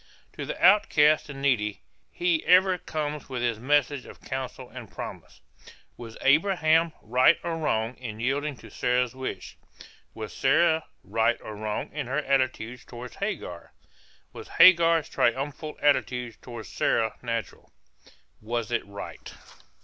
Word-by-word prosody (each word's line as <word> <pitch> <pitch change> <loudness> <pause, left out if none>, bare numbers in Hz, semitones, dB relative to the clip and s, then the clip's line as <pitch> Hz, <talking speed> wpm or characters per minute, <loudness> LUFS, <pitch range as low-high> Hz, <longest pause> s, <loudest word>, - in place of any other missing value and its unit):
To - - -6
the - - -5
outcast 155 -8 +4
and 135 -1 -8
needy 105 -7 0 0.3
he 175 -2 0
ever 185 0 +5
comes 150 -2 -4
with 125 -2 -3
his 115 -2 0
message 145 +1 +1
of - - -12
counsel 130 -1 -6
and 120 -5 -10
promise. - - -9 0.5
Was 115 -2 -10
Abraham 160 +1 +3
right 125 +4 +4
or 170 -1 -2
wrong 115 -5 -1
in 110 -4 -7
yielding 140 +3 -1
to - - -14
Sarah's 125 -1 0
wish? 130 0 -6 0.6
Was 110 -1 -7
Sarah 160 +3 +2 0.2
right 115 +1 +1
or 110 - -8
wrong 105 0 -4
in 150 -4 -4
her 135 +3 -2
attitude 130 -4 0
toward 120 0 -9
Hagar? - - -5 0.6
Was - - -9
Hagar's 165 -3 +6
triumphal 140 +5 -1
attitude 125 -5 +1
toward 120 -3 -8
Sarah 110 +3 0
natural? 115 -2 -5 0.7
Was 115 0 -3
it - - 0
right? 100 0 -9
130 Hz, 135 wpm, -26 LUFS, 120-150 Hz, 0.7 s, Hagar's